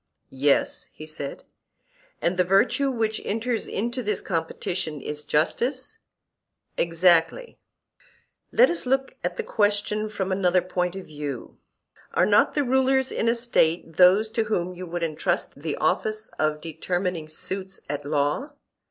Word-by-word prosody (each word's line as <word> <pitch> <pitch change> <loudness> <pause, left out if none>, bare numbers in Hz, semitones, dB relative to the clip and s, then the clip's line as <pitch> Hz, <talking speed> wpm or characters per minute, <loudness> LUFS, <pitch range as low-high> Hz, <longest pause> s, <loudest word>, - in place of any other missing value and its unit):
Yes, 140 +2 +1
he 155 - -9
said. 155 -3 -5 0.8
And 175 - +2
the 180 - +3
virtue 200 +9 +3
which 225 -4 -1
enters 225 +1 -1
into 240 +5 -2
this 210 -3 -2
competition 165 -1 -2
is 150 +2 -6
justice? 255 - 0 0.8
Exactly. 170 - +2 0.9
Let - - +5
us 345 -6 -2
look 270 +1 0
at 180 0 -2
the - - -1
question 210 0 0
from 195 -2 -3
another 185 -2 +2
point 180 0 -1
of 190 - -7
view: 145 -2 -6 0.6
Are - - +4
not - - +4
the 290 - +2
rulers 265 0 +2
in 230 - +1
a 235 - +3
State 170 -9 +1
those 195 +4 +6
to 225 0 0
whom 185 -4 -1
you 180 0 -7
would 170 0 -3
entrust 155 -3 -1
the 155 -1 -2
office 215 0 0
of 155 -1 +1
determining 170 0 -3
suits 190 +4 -6
at 145 0 -3
law? 145 - -1
185 Hz, 145 wpm, -25 LUFS, 160-225 Hz, 0.9 s, those